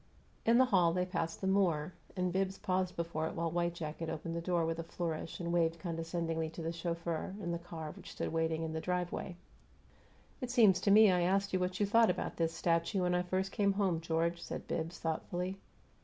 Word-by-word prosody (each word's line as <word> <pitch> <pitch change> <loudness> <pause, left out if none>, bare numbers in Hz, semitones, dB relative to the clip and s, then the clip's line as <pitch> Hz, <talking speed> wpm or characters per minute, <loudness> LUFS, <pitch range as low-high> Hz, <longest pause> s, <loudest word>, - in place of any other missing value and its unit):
In 230 +1 +6
the 260 - +7
hall 180 -8 +4
they 180 +1 +1
passed 165 -3 -3
the 190 - -1
Moor, 180 -4 +2 0.2
and 180 -1 0
Bibbs 190 0 0
paused 185 -1 -1
before 165 -2 -2
it - - -6
while 165 0 -1
white 170 0 0
jacket 160 0 -4
opened 165 +1 -4
the 170 - -2
door 170 -1 +1
with 165 0 -2
a - - -2
flourish 165 -1 -4
and 170 -1 -2
waved 165 -1 +2
condescendingly 165 -1 -2
to 165 - -8
the 165 - -1
chauffeur 170 +1 -3
in 175 -4 -3
the 170 - -2
car 165 -3 -7
which - - -11
stood - - -3
waiting 160 0 0
in 160 -1 -3
the 160 - -2
driveway. 180 0 -2 1.1
"It 250 - -3
seems 215 -7 +5
to 200 - +2
me 210 0 +8
I 180 -1 +2
asked 195 +3 +1
you 185 - +2
what 180 0 -1
you 205 - +3
thought 225 +2 +5
about 180 - -2
this 165 -1 +1
'statue' 170 +3 +1
when 180 0 +2
I 180 - +3
first 185 +2 -1
came 200 -3 +2
home, 190 -5 +1
George," 170 +1 0
said - - -6
Bibbs, 165 +2 -3
thoughtfully. 180 +4 -3
175 Hz, 215 wpm, -34 LUFS, 165-185 Hz, 1.1 s, me